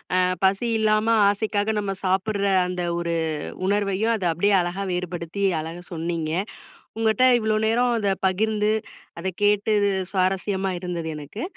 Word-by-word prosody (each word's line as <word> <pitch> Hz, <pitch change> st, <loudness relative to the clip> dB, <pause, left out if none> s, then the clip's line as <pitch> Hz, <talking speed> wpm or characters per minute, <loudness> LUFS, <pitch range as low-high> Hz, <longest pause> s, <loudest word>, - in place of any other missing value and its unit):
அ -, -, +3 dB, 0.3 s
பசி 195 Hz, +5 st, +2 dB
இல்லாம 215 Hz, 0 st, +2 dB, 0.2 s
ஆசைக்காக 205 Hz, +1 st, 0 dB
நம்ம 195 Hz, -1 st, -2 dB
சாப்பிடுற 195 Hz, +2 st, 0 dB, 0.2 s
அந்த 180 Hz, -1 st, -3 dB, 0.2 s
ஒரு 170 Hz, -1 st, -1 dB, 0.5 s
உணர்வையும், 205 Hz, +2 st, +1 dB
அது 200 Hz, -5 st, -3 dB
அப்பிடியே 200 Hz, +5 st, +2 dB
அழகா 175 Hz, +3 st, -3 dB
வேறுபடுத்தி 180 Hz, +1 st, -4 dB, 0.2 s
அழகா 165 Hz, +3 st, -6 dB
சொன்னீங்க. 165 Hz, -1 st, -3 dB, 0.7 s
உங்கட்ட 225 Hz, +3 st, +2 dB, 0.2 s
இவ்ளோ 215 Hz, -1 st, +1 dB
நேரம் 240 Hz, +2 st, +2 dB
அத 200 Hz, -3 st, +1 dB
பகிர்ந்து, 210 Hz, +2 st, +1 dB, 0.5 s
அத 190 Hz, -, -3 dB, 0.2 s
கேட்டு 210 Hz, +1 st, +3 dB, 0.4 s
சுவாரஸ்யமா 190 Hz, 0 st, 0 dB
இருந்தது 175 Hz, -2 st, -4 dB
எனக்கு. 150 Hz, -, -7 dB
195 Hz, 130 wpm, -24 LUFS, 180-215 Hz, 0.7 s, அ